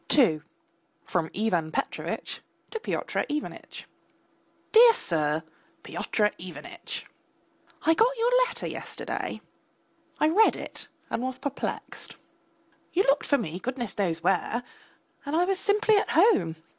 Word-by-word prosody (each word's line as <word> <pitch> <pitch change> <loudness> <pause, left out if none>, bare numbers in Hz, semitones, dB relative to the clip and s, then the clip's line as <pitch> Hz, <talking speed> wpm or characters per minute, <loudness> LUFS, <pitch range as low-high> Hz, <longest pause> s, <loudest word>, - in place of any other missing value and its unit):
II 165 - +5 0.6
(FROM 165 -3 -1
IVAN 180 -7 0
PETROVITCH - - -3 0.3
TO 450 - -3
PYOTR - - -2
IVANITCH) 300 0 -5 0.9
DEAR 465 +1 +9
SIR, 155 - 0 0.4
PYOTR 210 -1 0
IVANITCH! 340 - -7 0.8
I 325 - +5
got 475 +8 +3
your 465 +2 +2 0.2
letter 475 - -4
yesterday, - - -4 0.8
I 305 - +4
read 420 +7 +5
it - - -7 0.2
and - - -1
was 255 0 -2
perplexed. 280 -1 -4 0.8
You 375 - +4
looked 275 -3 +2
for 285 - +4
me, 180 - -4
goodness 240 -3 -3
knows 170 -5 -1
where, 195 +6 +1 0.6
and 285 +2 -2
I 345 +2 +4
was 380 0 0
simply 425 +1 +3
at - - +1
home. 260 - +4
260 Hz, 125 wpm, -27 LUFS, -, 0.9 s, DEAR